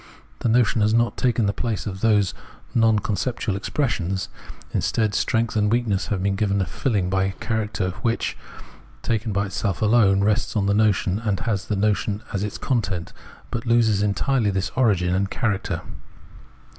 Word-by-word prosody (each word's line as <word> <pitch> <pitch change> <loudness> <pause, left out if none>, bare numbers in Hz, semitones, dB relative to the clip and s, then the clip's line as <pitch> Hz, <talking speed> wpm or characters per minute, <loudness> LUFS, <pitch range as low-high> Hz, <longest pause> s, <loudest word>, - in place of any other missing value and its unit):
The 120 - 0
notion 115 -1 +3
has 105 +2 +3
not 120 0 +2
taken 120 -3 +1
the 100 - +1
place 115 -2 -3
of 95 -2 -5
those 105 -5 +3 0.4
non 115 -3 +4
con 105 0 -1
ceptual 115 -3 -2
expressions; 95 - -2 0.4
instead, 110 -2 0
strength 115 +2 0
and 105 -1 +2
weakness 115 -5 0
have 95 -3 -2
been 100 0 +1
given 100 0 +1
a 95 - +1
filling 100 - -1
by 95 +1 +1
a 95 - -2
characteristic 105 -5 -3
which, 115 0 0 0.7
taken 110 -1 -1
by 100 +1 0
itself 100 -2 -2
alone, 105 -3 +4
rests 105 +3 +1
on 100 -2 +1
the 100 - +2
notion, 105 -2 +2
and 110 -2 -1
has 110 -5 -2
the 105 - 0
notion 105 +1 0
as 100 - -1
its 105 - -4
content, 100 -9 -2 0.4
but 120 0 -4
loses 115 -4 +3
entirely 105 +4 +1
this 95 0 -1
origin 95 -8 +2
and 95 +1 0
character. 105 -4 -2
105 Hz, 170 wpm, -23 LUFS, 95-115 Hz, 0.7 s, non